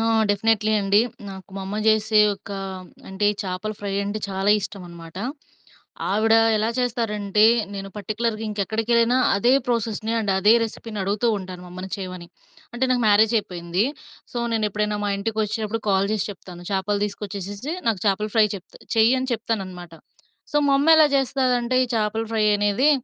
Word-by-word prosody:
ఆ! - - +1 0.3
డెఫినెట్‌లీ 215 +1 +2
అండి. 200 +1 +3 0.3
నాకు 190 0 -11
మా 195 - -4
అమ్మ 205 +2 -4
జెసే 215 0 +4
ఒక 200 +1 -14 0.6
అంటే 190 +2 -3
ఈ - - -10
చాపల 185 +3 -3
ఫ్రై 200 -1 -4
అంటే 205 +2 -3
చాలా 195 +1 0
ఇష్టమన్మాట. 175 -5 -9 0.9
ఆవిడ 220 +3 +3 0.2
ఎలా 215 +2 0
చేస్తారంటే, 215 -4 +1 0.3
నేను 195 0 -5
పర్టిక్యులర్‌గా 215 +2 -2
ఇంకెక్కడికెళ్ళినా 225 +4 +1 0.2
అదే 240 +5 +3
ప్రాసెస్‌ని 225 -2 -1
అండ్ 210 -3 -1
అదే 205 +3 +5
రెసిపీ‌ని 225 -1 -7
అడుగుతుంటాను 200 -3 -1
మా 180 - -11
అమ్మని 185 +1 -7
చేయమని. 185 -3 -7 0.5
అంటే 245 +2 0
నాకు 250 -1 +2
మ్యారేజ్ 215 +2 +5
అయిపోయింది. 175 -1 -2 0.5
సో, 245 - -3
నేను 220 -1 +1
ఎప్పుడైనా 210 +1 -1
మా - - 0
ఇంటికొచ్చినప్పుడు 220 +1 -2
కాల్ 195 0 +3
చేసి 215 -3 -1
చెప్తాను 180 -2 -11
చాపలు 200 +1 0
తీసుకొచ్చేసేసి 205 - -5 0.2
నాకు 210 -5 0
చాపల 205 +2 +1
ఫ్రై 220 -1 +6
చెప్తా 190 - -15 0.2
చెయ్యి 225 +2 +5
అని 260 - -3
చెప్తాననమాట. 190 -6 -4 0.6
సో, - - +1
మా 275 - +4
అమ్మ 285 +3 +1
ఎలా 310 -1 +7
చేస్తదంటే 255 -2 +1
ఈ - - -8
చాపల 220 +1 0
ఫ్రై 220 -1 +2
అనేది 205 +8 +3
210 Hz, 155 wpm, -23 LUFS, 195-225 Hz, 0.9 s, ఎలా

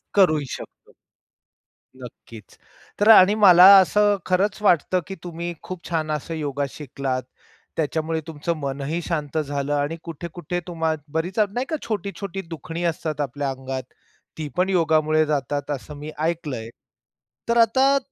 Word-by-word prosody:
करूही 155 -7 +4
शकतो. - - -14 1.1
नक्कीच. 115 -3 -12 0.4
तर 205 - +3
आणि 205 -2 +8
मला 185 -4 +8
असं 205 +2 +4
खरंच 195 +3 0
वाटतं, 185 -2 +3
की 195 - -6
तुम्ही 175 0 -5
खूप 185 -2 -8
छान 160 -2 -1
असं 150 +2 -3
योगा 145 -3 -2
शिकलात, 135 -2 -4 0.5
त्याच्यामुळे 160 +1 -1
तुमचं 160 +1 -3
मनही 140 +3 -3
शांत 155 -3 -3
झालं. 145 -1 -2
आणि 145 +3 -1
कुठे-कुठे 170 +1 -5
तुम्हा 165 -2 -1 0.2
बरीच 175 +6 -2
अग 205 -2 +2
नाही 245 +3 -1
का 315 - -1
छोटी-छोटी 200 -3 -4
दुखणी 165 +1 -6
असतात 155 -2 -4
आपल्या 140 0 -2
अंगात, 130 0 -5 0.5
ती 155 -2 -4
पण 185 +1 +2
योगामुळे 155 -3 +2
जातात 145 -1 -2
असं 145 +1 -6
मी 150 +2 -7
ऐकलंय. 155 -8 -2 0.8
तर 235 - +3
आता 265 +5 +4
160 Hz, 140 wpm, -23 LUFS, 145-185 Hz, 1.1 s, आणि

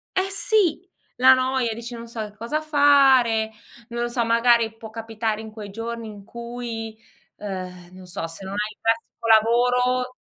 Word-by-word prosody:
Eh 380 +1 +1
sì, 390 -4 +2 0.3
la 260 +1 +8
noia, 255 -3 0
dici: 235 +2 -8
"non 235 0 -8
so 230 -1 -6
che 210 -1 -7
cosa 235 +8 -3
fare", 270 -7 +4 0.4
non 235 0 -4
lo 240 - 0
so 240 0 -1
magari 230 -1 +3
può 225 -1 -10
capitare 225 -1 -3
in 220 -1 -9
quei 215 -2 -9
giorni 230 +2 -6
in 205 -2 -10
cui, 235 -1 -7 0.4
uhm, 185 -3 -7
non 185 0 -12
so, 175 -2 -5
se 165 +4 -10
non 195 - -6
hai 210 +1 -2
il - - -36
classico 230 0 -2
lavoro 250 +3 +3
230 Hz, 175 wpm, -23 LUFS, 220-250 Hz, 0.4 s, la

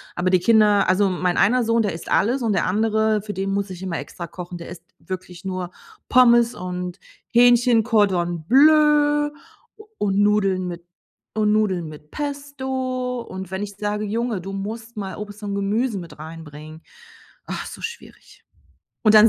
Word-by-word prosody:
Aber 180 +1 0
die 185 -1 +4
Kinder 210 -1 +4
also 195 +1 +3
mein 180 -1 -1
einer 245 +4 +4
Sohn, 230 0 +2
der 200 - -1
isst 165 - -8
alles 245 +6 +2
und 220 -3 +1
der - - +1
andere, 220 +1 +1
für 205 0 -6
den 195 +1 -2
muss 200 0 -1
ich 185 0 -8
immer 175 -3 -3
extra 170 -1 -7
kochen, 175 +1 -8
der 170 - -9
isst 175 -1 -10 0.2
wirklich 180 +1 -8
nur 185 -1 -4 0.4
Pommes 240 -2 +5
und 180 0 -5 0.3
Hähnchen, 240 -1 +5
Cordon 180 -7 +1
Bleu 295 +2 +5 0.5
u 430 - -14
und 200 -1 0
Nudeln 195 -3 +2
mit 170 0 -7 0.5
und 215 -1 +2
Nudeln 190 -6 +1
mit 150 0 -13
Pesto. 265 -3 -3
Und 190 -5 -8
wenn 190 +1 -3
ich 200 -1 -7
sage: 210 0 -2
„Junge, 225 -1 -1
du 195 +2 -7
musst 225 +4 -6
mal 195 -2 -5
Obst 210 0 -8
und 200 -1 -3
Gemüse 205 +2 0
mit 170 -3 -10
rein 160 +1 -8
bringen“, 155 +2 -11 0.6
ach, - - -5
so - - -10
schwierig. 470 +1 -9 0.6
Und 215 -1 +5
dann 215 +1 +9
205 Hz, 175 wpm, -22 LUFS, 185-235 Hz, 0.6 s, dann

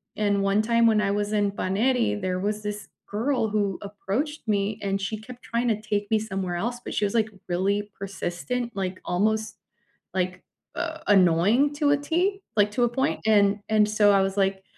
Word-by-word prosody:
And 200 -2 +1
one 195 +2 +3
time 230 +1 +3
when 220 -2 +4
I 200 - +1
was 205 +1 -1
in 205 -1 +2
Paneri, 220 +4 0
there 185 -1 -1
was 210 +2 -2
this 210 0 -5 0.2
girl 230 +3 0
who 205 -3 0
approached 210 +9 -4
me 205 0 0
and 195 -1 -1
she 200 +3 -3
kept 245 +3 -11
tryna 235 -3 +1
take 205 -1 -2
me 220 - +4
somewhere 190 -4 -3
else, 240 +7 -3
but - - -6
she 210 - +1
was, 200 - -2
like, 220 -2 +2 0.2
really 200 +3 0
persistent, 200 +5 -3
like 185 -1 -3
almost, 215 +4 0 0.6
like, 180 -1 -2 0.3
uh, 320 -2 -3
annoying 205 - +4
to 290 0 +1
a 290 - +4
tee, 355 +7 0
like, 210 -1 +3
to 245 +4 +1
a - - 0
point, 265 +3 0
and 205 -2 +4
and 215 -1 +4
so 210 -1 +4
I 195 - +4
was 195 +1 -1
like, 195 -1 +1
210 Hz, 190 wpm, -25 LUFS, 195-230 Hz, 0.6 s, when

